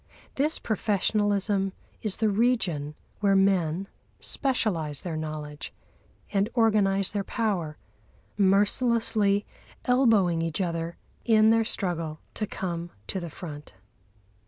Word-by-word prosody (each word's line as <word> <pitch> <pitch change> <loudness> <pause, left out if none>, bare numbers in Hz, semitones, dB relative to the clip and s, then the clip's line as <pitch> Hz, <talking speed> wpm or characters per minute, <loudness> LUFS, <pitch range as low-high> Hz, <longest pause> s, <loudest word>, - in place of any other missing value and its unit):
This 300 +4 +1
professionalism 205 -2 0 0.3
is 215 -3 -1
the 220 -1 +2
region 195 -10 +1 0.2
where 200 -1 +3
men 190 -2 +2 0.3
specialise 180 - 0
their 175 -4 -4
knowledge 155 -1 -5 0.6
and 200 +2 +2
organise 200 -4 +3
their 205 -1 -1
power, 190 -9 -2 0.6
mercilessly 205 +1 +3 0.4
elbowing 220 -10 +3
each 165 +1 -2
other 170 -2 -2 0.3
in 220 -1 +5
their 225 0 +4
struggle 165 -7 -2
to 215 - -3
come 175 -3 -4 0.2
to 190 - -3
the 170 -2 -6
front. 150 - -9
195 Hz, 110 wpm, -27 LUFS, 165-215 Hz, 0.6 s, in